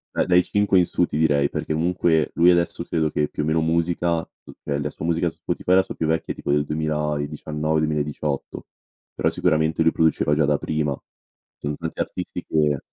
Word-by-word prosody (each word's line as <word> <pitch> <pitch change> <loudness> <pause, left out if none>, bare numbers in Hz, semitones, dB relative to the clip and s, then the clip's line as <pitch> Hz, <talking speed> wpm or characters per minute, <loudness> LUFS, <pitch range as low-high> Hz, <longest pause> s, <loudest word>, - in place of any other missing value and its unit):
Beh, - - +2
dai 90 0 +5
5 100 0 +2
in 90 - +4
su, 90 - +1
ti 75 - -4
direi, 75 -2 +2
perché 80 - -2
comunque, 85 -1 +1
lui 85 +2 +5
adesso 85 -1 +2
credo 80 -3 -1
che 75 - 0
più - - -3
o - - -1
meno 80 +1 +1
musica 85 +1 +1 0.3
mhmm, - - -13 0.2
eh, 70 - -1
la 75 - -2
sua 75 - -7
musica 85 +1 +1
su - - -17
Spotify, 90 - 0
la 95 - +5
sua - - -7
più 80 - -2
vecchia 80 +1 -1
è - - -22
tipo - - -3
del 75 0 +3
2019-2018; 75 -1 -2 0.5
però - - +1
sicuramente 80 +1 +1
lui 80 - +4
produceva 80 -2 +2
già 75 0 +3
da 75 0 +2
prima. 75 -3 -2 0.6
Son 75 0 -4
tanti 80 -1 -6
artisti - - -4
che 75 -3 +1
80 Hz, 200 wpm, -23 LUFS, 75-85 Hz, 0.6 s, dai